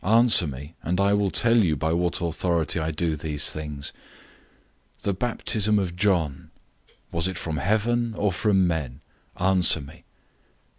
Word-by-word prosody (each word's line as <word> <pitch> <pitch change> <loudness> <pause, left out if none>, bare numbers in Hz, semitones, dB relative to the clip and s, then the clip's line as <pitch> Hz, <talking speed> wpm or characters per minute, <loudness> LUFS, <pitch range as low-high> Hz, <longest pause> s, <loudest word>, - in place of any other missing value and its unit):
Answer 110 -4 +5
me, 70 +3 -8
and 90 +4 -2
I 100 +1 +3
will 100 -1 +1
tell 115 +4 +2
you 90 -9 +3
by 80 +3 -1
what 85 +1 -1
authority 85 0 0
I 80 0 -2
do 80 0 -1
these 75 -1 -1
things. 75 -2 -6 1.0
011:030 - - -26
The 100 - 0
baptism 105 -1 +1
of 90 -4 -2
John 90 -7 0 0.6
was 85 +2 0
it 95 - -4
from 80 -2 -4
heaven, 110 - 0
or 105 -1 +1
from 95 +1 +2
men? 75 -6 -3 0.4
Answer 95 -3 +3
me." 70 - -13
90 Hz, 155 wpm, -24 LUFS, 80-100 Hz, 1.0 s, Answer